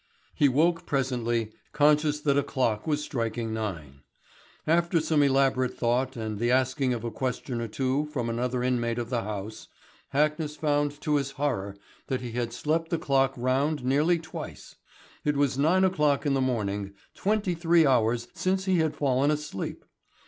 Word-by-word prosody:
He 145 - +3
woke 165 +6 +2
presently, 120 -5 -1 0.2
conscious 150 0 +3
that 140 -2 +2
a 140 - +4
clock 120 -6 -1
was 150 -1 0
striking 115 -4 -3
nine. 80 -11 -5 0.7
After 170 +1 +2
some 155 -1 +2
elaborate 135 -2 +2
thought 125 +2 0
and 110 -2 -4
the 120 +1 +1
asking 130 +1 +2
of 120 -2 -2
a 115 - -3
question 125 -1 -3
or 115 - -3
two 130 +6 -1
from 140 -6 -3
another 125 +2 -1
inmate 120 -2 0
of 120 0 -4
the 120 -2 0
house, 105 0 -6 0.4
Hackness 150 +1 0
found 145 -1 0
to 150 -1 +1
his 140 -1 -3
horror 100 -9 -1 0.3
that 130 - -2
he 120 -2 -5
had 120 0 -2
slept 160 +6 -1
the 170 - 0
clock 135 -3 +1
round 130 +3 0
nearly 150 +7 +3
twice. 160 -1 -8 0.5
It 150 -1 +1
was 140 -2 +2
nine 165 +7 +3
o'clock 150 -6 +2
in 145 - +2
the 135 - +1
morning, 100 -6 -2 0.2
twenty 205 -2 0
three 165 -1 +3
hours 120 -2 +2
since 190 +1 -1
he 190 -2 +2
had 160 -2 0
fallen 135 0 +2
asleep! 150 -9 -4
135 Hz, 170 wpm, -27 LUFS, 120-150 Hz, 0.7 s, a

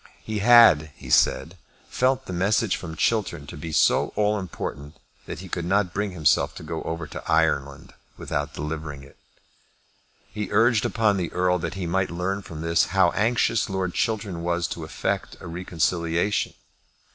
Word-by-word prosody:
He 110 -1 -3
had, 105 -9 +7
he 65 - -9
said, 85 +7 +2 0.3
felt 130 +1 0
the 95 - -6
message 100 +4 +1
from 80 -3 -7
Chiltern 85 -5 0
to - - -9
be 80 +2 -7
so - - +3
all 105 0 +1
important 75 -5 -6 0.3
that - - -6
he 95 - -9
could 85 -1 -3
not 95 +1 +1
bring 100 +1 -1
himself 80 -4 +2
to - - -9
go 80 0 -5
over 85 0 -4
to 75 - -8
Ireland 70 -4 0 0.2
without 75 +1 -3
delivering 75 -2 -5
it. 70 - -17 1.2
He 105 -1 -4
urged 115 +1 +3
upon 110 -3 +2
the 90 -3 -3
Earl 90 0 +1
that - - -4
he 95 -2 -4
might 95 +3 0
learn 90 +4 -2
from 80 -5 -9
this 85 0 +2
how - - +5
anxious 115 0 +1
Lord 95 -2 -2
Chiltern 100 -6 -2
was 85 0 -1
to - - -6
effect - - -3
a - - -11
reconciliation. 85 +2 -1
90 Hz, 170 wpm, -24 LUFS, 80-105 Hz, 1.2 s, had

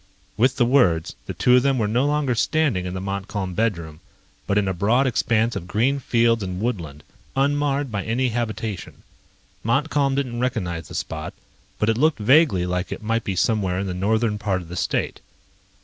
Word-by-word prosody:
With 125 +5 +3
the 120 - +3
words, 95 - +2
the - - -5
two 125 - +4
of - - +4
them 135 0 +2
were 110 -3 +1
no 120 +6 +1
longer 145 -3 +1
standing 125 -6 +1
in 90 - -5
the - - -3
Montcalm 95 0 -4
bedroom, 85 -8 -2 0.5
but 100 - +1
in 100 -2 +2
a 95 - 0
broad 110 +9 +2
expanse 115 -2 +1
of 85 - -5
green 125 +9 +1
fields 115 -2 +2
and 90 -2 -4
woodland, 85 - -3 0.3
unmarred 140 -1 +1
by 100 -3 -2
any 125 +5 0
habitation. 110 -4 -4 0.6
Montcalm 140 +3 +1
didn't 125 -4 -2
recognize 85 -10 -2
the - - -9
spot, 80 -1 -5 0.4
but 105 - 0
it 115 +1 +1
looked 155 +2 +3
vaguely 115 - +4
like 90 +1 -2
it - - -6
might 115 +1 0
be 95 - -3
somewhere 95 -2 +1
in 100 - -1
the 95 - -3
northern 105 +3 0
part 95 -3 -1
of 85 - -14
the 90 - -6
state. - - -1
110 Hz, 190 wpm, -23 LUFS, 95-130 Hz, 0.6 s, two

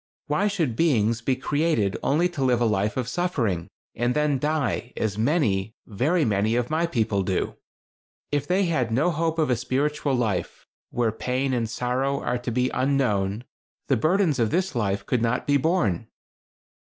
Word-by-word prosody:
Why 150 +8 +1
should 165 - -1
beings 115 -7 +2
be 130 +2 +1
created 145 -7 0
only 155 +6 +2
to 150 -6 -3
live 125 -2 +3
a 120 - +2
life 105 0 0
of 125 -3 -1
suffering, 120 - -1 0.3
and 120 +2 0
then 150 -2 +1
die, 140 -5 -1
as 105 -3 -1
many, 110 - +1
very 150 - +1
many, 110 +1 +1
of 125 +3 -1
my 165 +2 +1
people 110 -9 0
do? 95 -1 -1 0.8
If 145 -1 -1
they 190 +2 +2
had 130 -9 0
no 145 +10 +2
hope 165 0 -1
of 155 -5 +1
a - - +4
spiritual 140 +3 -1
life, 105 -8 -2 0.2
where 120 -2 0
pain 130 +4 -1
and 115 -3 -1
sorrow 130 +4 -1
are 125 - -2
to 125 - -4
be 125 +2 0
unknown, 120 -6 0 0.5
the 135 - +4
burdens 155 - +2
of 115 -2 +2
this 185 - 0
life 100 -4 -1
could 125 -3 0
not 115 +1 0
be 145 0 +3
borne." 125 - 0
125 Hz, 175 wpm, -25 LUFS, 110-150 Hz, 0.8 s, a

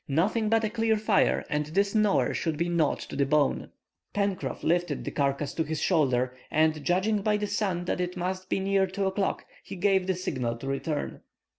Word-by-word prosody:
"Nothing 205 +9 +1
but 225 0 +3
a 215 - +1
clear 225 -1 +1
fire, 215 -1 +2
and 150 -2 -1
this 200 +5 +1
gnawer 210 -2 +2
shall 160 - -1
be 170 +3 -1
gnawed 170 -4 +1
to - - -8
the 140 - +2
bone." 145 0 +1 0.5
Pencroff 200 -3 -1
lifted 175 -3 0
the - - -3
carcase 140 0 -1
to 160 - 0
his 160 -1 -3
shoulder, 130 -4 +1
and 155 -1 +2
judging 195 +4 +1
by 210 +1 +2
the 210 - -2
sun 200 -4 -1
that 180 - -1
it 180 +1 -3
must 185 +1 -3
be - - +1
near 195 0 +2
2 195 +1 -2
o'clock, 190 +1 -1 0.2
he 195 - -8
gave 190 0 +2
the 190 - +1
signal 130 -10 -2
to 120 - -9
return. 140 +3 -3
180 Hz, 200 wpm, -27 LUFS, 150-200 Hz, 0.5 s, but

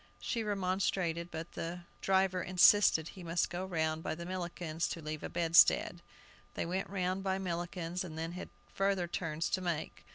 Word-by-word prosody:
She 230 - -2
remonstrated, 185 -4 0
but 160 0 -6
the 170 +2 -5 0.2
driver 190 -1 +2
insisted 180 -2 +5
he 190 - -11
must 170 0 0
go 180 +1 -3
round 160 -3 -1
by 160 - -3
Millikin's 170 -1 -3
to - - -4
leave 155 -1 -5
a - - -5
bedstead. 170 +1 +4 0.5
They - - -1
went 185 +3 -2
round 185 0 -1
by 190 -1 0
Millikin's, 175 -1 -3
and 160 -3 -7
then 165 +1 -3
had 180 - -7 0.2
further 195 -2 +1
turns 165 -2 -2
to 185 - +1
make. 170 -4 -3
175 Hz, 165 wpm, -33 LUFS, 165-185 Hz, 0.5 s, insisted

